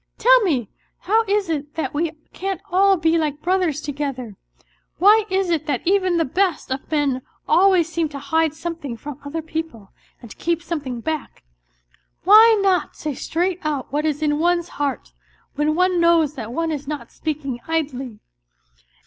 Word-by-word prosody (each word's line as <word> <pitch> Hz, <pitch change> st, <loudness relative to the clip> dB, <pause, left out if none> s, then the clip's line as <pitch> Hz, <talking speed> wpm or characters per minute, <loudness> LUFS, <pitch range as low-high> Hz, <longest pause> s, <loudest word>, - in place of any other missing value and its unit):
Tell -, -, +6 dB
me, 290 Hz, -, 0 dB, 0.3 s
how 440 Hz, +5 st, +2 dB
is 405 Hz, -1 st, +1 dB
it 300 Hz, -2 st, -4 dB
that 320 Hz, -, -3 dB
we 320 Hz, +3 st, 0 dB, 0.2 s
can't 385 Hz, -2 st, -3 dB
all 390 Hz, +1 st, +4 dB
be 325 Hz, 0 st, +2 dB
like 300 Hz, -2 st, -2 dB
brothers 360 Hz, -5 st, +1 dB
together? 275 Hz, -7 st, -4 dB, 0.6 s
Why 420 Hz, +3 st, +5 dB
is 380 Hz, -1 st, 0 dB
it 315 Hz, -2 st, -1 dB
that 290 Hz, -, -2 dB
even 370 Hz, -1 st, +2 dB
the 330 Hz, -, +2 dB
best 350 Hz, -1 st, -1 dB
of 265 Hz, +1 st, -4 dB
men 285 Hz, -4 st, 0 dB, 0.3 s
always 370 Hz, -3 st, +4 dB
seem 330 Hz, -1 st, -1 dB
to 285 Hz, -, -7 dB
hide 315 Hz, +2 st, 0 dB
something 320 Hz, -7 st, -5 dB
from 290 Hz, +3 st, -8 dB
other 315 Hz, +3 st, -5 dB
people 315 Hz, -11 st, -6 dB, 0.3 s
and 235 Hz, -3 st, -13 dB
to -, -, -12 dB
keep 340 Hz, 0 st, -1 dB
something 275 Hz, -8 st, -4 dB
back? 310 Hz, +2 st, -4 dB, 0.8 s
Why 435 Hz, +4 st, +8 dB
not 375 Hz, -2 st, +1 dB
say 300 Hz, -1 st, -4 dB
straight 350 Hz, +6 st, -2 dB
out 290 Hz, -4 st, -3 dB
what 300 Hz, +2 st, +1 dB
is 300 Hz, 0 st, -2 dB
in 295 Hz, -1 st, +1 dB
one's 345 Hz, +1 st, +1 dB
heart, 285 Hz, -2 st, -3 dB, 0.4 s
when 300 Hz, +2 st, 0 dB
one 365 Hz, 0 st, +2 dB
knows 335 Hz, -3 st, +4 dB
that 230 Hz, -6 st, -7 dB
one 330 Hz, +5 st, -1 dB
is 290 Hz, -2 st, -5 dB
not 300 Hz, -1 st, -5 dB
speaking 285 Hz, -5 st, -4 dB
idly 270 Hz, -8 st, -2 dB
320 Hz, 170 wpm, -21 LUFS, 285-355 Hz, 0.8 s, Why